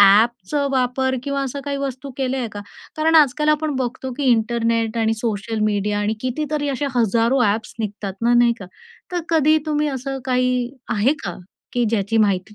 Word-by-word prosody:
ॲपच 205 +2 +5 0.2
वापर 260 0 +1
किंवा 280 0 -2
असं 275 +1 -4
काही 280 -1 -2
वस्तू 275 -1 -4
केलेले 265 -1 -1
आहे 245 -3 -2
का? 205 - -6 0.4
कारण 320 +1 +2
आजकाल 300 0 +4
आपण 305 -1 +1
बघतो 260 0 -3
की 285 - -2
इंटरनेट 230 0 +1
आणि 225 0 +2
सोशल 220 0 -3
मीडिया 205 0 0
आणि 205 +1 0
कितीतरी 290 +3 -2
अशा 280 +1 -1
हजारो 235 +2 +2
ॲप्स 215 +1 0
निघतात 205 -2 -4
ना 240 +1 +4
नाही 240 0 +5
का? 195 - -7 0.5
तर 355 - 0
कधी 310 -1 +4
तुम्ही 300 0 +1
असं 270 0 -4
काही, 250 -1 +1 0.2
आहे 230 +7 +3
का? 175 - -4 0.3
की 245 -1 +1
ज्याची 215 0 0
माहिती 200 0 +1
245 Hz, 175 wpm, -21 LUFS, 220-275 Hz, 0.5 s, ॲपच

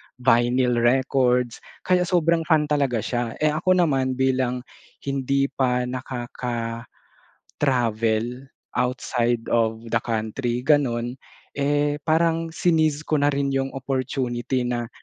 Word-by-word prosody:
vinyl 125 0 +2
records. 125 0 +2 0.2
Kaya 180 -1 +2
sobrang 170 -2 +2
fan 160 -3 +4
talaga 135 -7 +1
siya. 120 -2 -2
Eh 155 - +4
ako 185 +4 +2
naman, 130 -5 +1
bilang 130 -1 0 0.4
hindi 140 0 0
pa 125 -2 +1
nakaka-travel 120 -2 -5 1.7
outside 120 -2 0
of 115 0 +1
the - - +3
country, 120 +2 -2
ganun, 130 -4 +1 0.3
eh 145 +1 0
parang 165 +1 +2
sineize 160 -3 +1
ko 155 -2 +1
na 145 - +3
rin 140 -1 0
yung 135 0 0
opportunity 130 -1 -2
na 120 -1 -2
130 Hz, 110 wpm, -23 LUFS, 120-145 Hz, 1.7 s, fan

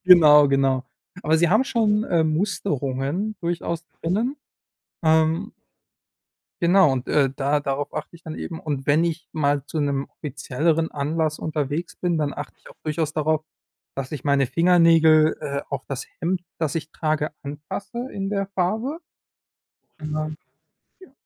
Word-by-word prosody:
Genau, 150 -5 +8
genau. 135 -1 +2 0.4
Aber 160 -2 +3
sie 170 0 +3
haben 215 +7 +4
schon, 215 -5 +2
äh, 170 -2 +2
Musterungen 155 +1 -1
durchaus 170 -1 -2 0.2
drinnen. 215 - 0 0.7
Ähm 160 +5 +2 1.1
Genau 175 -2 +5
und, 130 -2 -2
äh, 140 -3 +3
da 145 +1 +1
darauf 145 0 -2
achte - - -6
ich 170 - -16
dann 160 -1 -7
eben. 165 -2 -6
Und 140 -3 -4
wenn 150 +3 +4
ich 170 0 -2
mal 145 -2 0
zu 155 - -4
'nem 140 -1 0
offizielleren 155 +3 -1
Anlass 155 +2 -1
unterwegs 155 +2 -3
bin, 175 -3 -1
dann 145 -2 -1
achte 145 0 -7
ich - - -16
auch - - -15
durchaus 155 0 -1
darauf, 155 0 +1 0.5
dass 135 -1 -4
ich 145 -4 -5
meine 140 -1 +3
Fingernägel, 165 -1 +5
äh, 140 -2 -2
auf 140 -1 -2
das 135 -1 -4
Hemd, 175 +2 0 0.2
das 160 -2 -1
ich 160 -1 -4
trage, 155 -1 -1
anpasse 195 - -6
in 195 -1 -3
der 200 -1 -1
Farbe. 220 - -1 1.0
Und 155 0 -5
dann 155 0 -3 0.7
ja. 375 - -15
155 Hz, 150 wpm, -23 LUFS, 145-175 Hz, 1.1 s, Genau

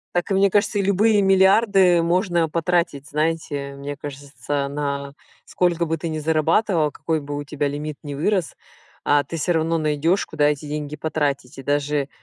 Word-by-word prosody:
Так 175 +3 -1
и - - +3
мне 195 +1 +4
кажется 205 +1 +1
и - - +3
любые 205 +2 +3
миллиарды 190 -2 +4
можно 175 -1 +1
потратить, 170 -3 0
знаете, 150 -2 -2
мне 140 +1 -6
кажется, 145 0 -4
на 140 -1 -4 0.3
сколько 175 -1 0
бы 165 0 -1
ты 165 +1 -4
ни 155 - -3
зарабатывал, 160 +2 +1
какой 160 +1 -2
бы 145 0 -6
у 145 - -4
тебя 145 0 -2
лимит 145 +1 -5
ни 145 -1 -6
вырос, 170 +1 -1 0.5
а 145 0 +3
ты 165 - -6
всё 175 +4 0
равно 165 0 +1
найдёшь 155 +4 +1
куда 145 - 0
эти 150 0 -3
деньги 150 0 -4
потратить, 145 -4 -2
и 135 - -8
даже 145 0 0
155 Hz, 175 wpm, -22 LUFS, 145-175 Hz, 0.5 s, мне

